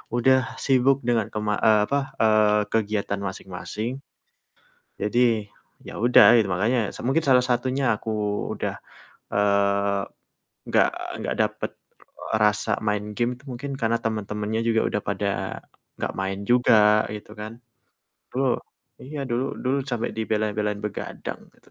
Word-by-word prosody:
udah 130 +2 +5 0.3
sibuk 135 0 +4
dengan 115 -3 +2
ke - - -4
ma 105 - +2
eee, 110 -1 +6
apa, 140 +5 +1 0.2
eee, 110 -1 +4
kegiatan 105 -2 0
masing-masing. 95 +4 -5 1.1
Jadi, 115 -1 +2 0.4
ya - - -8
udah, 125 - +7
i 115 - +6
makanya, 110 +8 +1 0.3
mungkin 155 +5 +2
salah 125 -1 +6
satunya 130 +2 0
aku 110 - -6 0.4
udah, - - -3 0.6
eee, 100 0 +2 0.7
nggak - - +4 0.3
nggak - - -2
dapet, - - -2
e 110 - -7
rasa 105 +1 +2 0.2
main 105 0 0
game 120 0 +1
itu 125 - -16
mungkin 140 +3 -5
karena 115 +1 +2
temen-temennya 105 0 -2
juga, 115 -1 +3
udah 105 - -2
pada 100 0 -1 0.7
gak - - -2
main 95 +1 -2
juga, 105 -3 +5
gitu 105 - -10
kan. 105 +1 -6 0.8
Dulu 135 +2 0 0.6
iya, 145 +3 -7
dulu 120 +3 0 0.2
dulu 130 +2 +1
sampe 120 -2 -1
dibela-belain 105 -1 -1
begadang, 105 - -5
gitu. - - -25
110 Hz, 135 wpm, -24 LUFS, 105-120 Hz, 1.1 s, udah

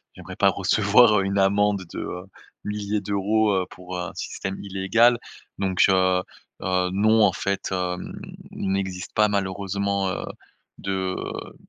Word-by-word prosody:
j'aimerais - - -9
pas - - +4
recevoir, 105 +1 +4
heu, - - +1
une 100 +1 -1
amende 100 0 +2
de, - - -5
heu, 90 +1 -5 0.4
milliers 105 0 -2
d'euros, 105 +2 +1
heu, 95 -1 +1
pour 90 0 -7
un 90 -1 -4
système 95 0 -5
illégal. 100 +5 +2 0.4
Donc, 95 -2 +2
heu 95 -1 +3 0.4
heu, 90 0 +1
non, 110 +3 +4
en 100 - +5
fait 100 +1 -2 0.8
il 95 - -3
n'existe 95 -2 -3
pas 105 0 +4
malheureusement, 100 0 -1
heu, 95 - -3 0.5
de, 95 -1 -2 0.3
heu - - -13
100 Hz, 145 wpm, -24 LUFS, 95-105 Hz, 0.8 s, en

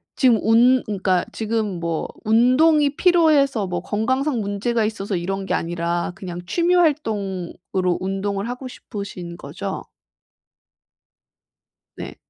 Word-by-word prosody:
지금 250 -4 +4
운 245 +3 +4
그러니까 190 -3 0
지금 215 -4 -2
뭐 170 -2 -2 0.2
운동이 280 +7 +4
필요해서 295 - +3
뭐 175 -1 -3
건강상 260 +7 0
문제가 215 +2 -1
있어서 205 -2 -3
이런 195 +3 -3
게 - - -2
아니라 170 +1 -1
그냥 180 -3 -7
취미 345 - +1
활동으로 195 - 0
운동을 195 +2 -2
하고 250 +1 -5
싶으신 200 -8 -8
거죠? 185 +7 -6 2.1
네. - - -8
210 Hz, 255 characters per minute, -22 LUFS, 185-255 Hz, 2.1 s, 지금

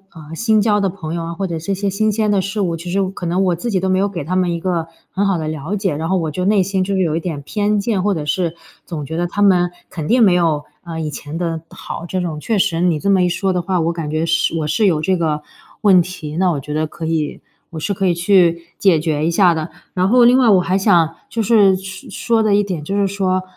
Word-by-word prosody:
呃， 155 0 -11
新 220 +3 +2
交 210 -1 +2
的 195 -1 +1
朋 175 -4 -6
友 170 -1 -3
啊， 170 - -5
或 195 - -2
者 165 -3 -3
这 195 +5 -2
些 200 +1 -2
新 215 +2 +1
鲜 215 0 0
的 200 -2 +2
事 195 +3 -4
物。 175 -4 0
其 170 +2 -7
实 195 +2 +1
可 175 -2 -6
能 180 +3 +1
我 180 -2 +2
自 205 +8 -4
己 195 -4 +1
都 190 - -1
没 185 0 +2
有 200 +1 +1
给 170 -6 -5
他 180 +5 -3
们 180 -1 +1
一 170 - -2
个 170 -2 -2 0.2
很 200 +1 0
好 195 -3 +1
的 155 -1 -3
了 155 +5 -3
解， 190 -7 -1
然 160 +3 -3
后 190 - +2
我 160 -3 -2
就 180 +4 -3
内 205 -1 +3
心 190 0 -1
就 195 +1 -1
是 190 - +1
有 160 -4 +1
一 - - 0
点 165 -3 -4
偏 210 +5 0
见。 200 -1 0
或 205 -1 +1
者 150 -3 -4
是 170 +2 -1 0.3
总 155 -4 -6
觉 160 - -6
得 175 +1 0
他 205 +4 -1
们 180 -3 +4 0.2
肯 155 -3 -5
定 240 0 +4
没 190 -4 +5
有， 165 -4 +1 0.2
呃， 165 -2 -6
以 155 -2 -3
前 150 +3 -7
的 165 -2 -2
好。 170 - -7
这 185 - -2
种， 165 -4 -3
确 220 +7 -1
实 170 -3 +1
你 175 -4 +2
这 200 +3 +1
么 190 -2 +4
一 180 - +2
说 190 +2 0
的 180 - 0
话， 185 +1 -1
我 165 +1 0
感 165 -3 -4
觉 155 +1 -1
是 165 0 +1
我 155 - -1
是 205 +7 +2
有 155 -4 +2
这 185 +4 +1
个 155 -3 -1 0.4
问 190 -4 +6
题。 165 -4 -6
那 185 -1 +3
我 150 -5 -1
觉 150 +2 -6
得 155 0 0
可 165 +1 -7
以 160 -2 -2 0.3
我 160 - -6
是 200 +6 -2
可 195 0 -2
以 175 - +3
去 170 -2 +3 0.2
解 180 -6 +4
决 155 -1 -1
一 165 - +1
下 175 0 +4
的。 160 -1 -3 0.2
然 185 0 +1
后 245 0 +5
另 245 +2 +6
外 245 -4 +4
我 190 -3 +6
还 180 +2 0
想 175 -5 +3
就 230 - -2
是 205 -3 +5
说 190 0 -9
说 230 -2 0
的 215 -2 +2
一 205 - +3
点， 180 -7 -4
就 195 +6 -3
是 200 -1 +2
说， 185 -1 -1
180 Hz, 310 characters per minute, -18 LUFS, 165-195 Hz, 0.4 s, 问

